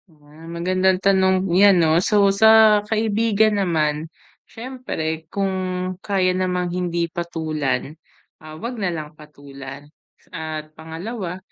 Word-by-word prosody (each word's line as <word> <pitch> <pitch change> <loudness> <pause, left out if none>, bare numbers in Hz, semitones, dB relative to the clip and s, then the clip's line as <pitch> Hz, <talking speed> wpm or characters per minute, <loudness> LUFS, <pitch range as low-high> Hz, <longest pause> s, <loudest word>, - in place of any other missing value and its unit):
Ah, 155 +1 -16
magandang 185 +2 +1
tanong 190 0 +2
yan, 195 +1 +6
'no? 165 0 +3
So, 205 +1 +3
sa 220 0 +6
kaibigan 220 -1 +1
naman, 155 -3 -1 0.4
siyempre 160 -11 -5
kung 195 -1 -1 0.5
kaya 190 -2 +1
namang 180 -1 -1
hindi 175 -1 -1
patulan, 155 -5 -3 0.5
ah, 155 0 -11
'wag 235 +5 -6
nalang 165 -5 -3
patulan. 140 -2 -12 0.5
At 155 -2 -6
pangalawa, 175 +4 -6
175 Hz, 110 wpm, -21 LUFS, 155-200 Hz, 0.5 s, yan